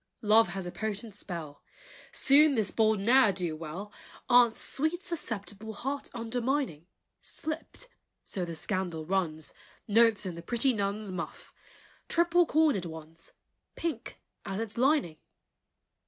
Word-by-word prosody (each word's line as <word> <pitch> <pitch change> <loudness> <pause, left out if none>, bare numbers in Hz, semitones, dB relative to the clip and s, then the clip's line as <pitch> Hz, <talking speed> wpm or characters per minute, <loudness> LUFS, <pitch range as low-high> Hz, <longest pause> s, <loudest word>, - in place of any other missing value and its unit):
Love 220 +1 +6
has 195 -2 -4
a 175 - -4
potent 215 +1 -4
spell! 170 -7 -7 0.5
Soon 290 +1 +5
this 215 -4 0
bold 220 -2 +3
ne'er 235 +2 +5
do 175 -4 -2
well, 170 +7 -7 0.4
Aunt's 240 -2 +6
sweet 315 +6 -1
susceptible 220 - -5
Heart 275 +6 -4
undermining, 235 - -2 0.3
Slipped, 320 +10 -6 0.4
so 185 - -3
the 170 -1 -4
scandal 175 -3 -3
runs, 165 -4 -1 0.3
Notes 225 -1 +4
in 185 - -3
the 170 - -8
pretty 240 +8 +2
nun's 205 -1 -2
Muff, 180 -2 -6 0.6
triple 345 0 +4
cornered 300 - +3
ones, 160 0 -10 0.4
Pink 335 -1 -4 0.2
as 195 +1 -4
its 225 -2 -4
lining! 260 - +2
215 Hz, 125 wpm, -30 LUFS, 180-260 Hz, 0.6 s, Love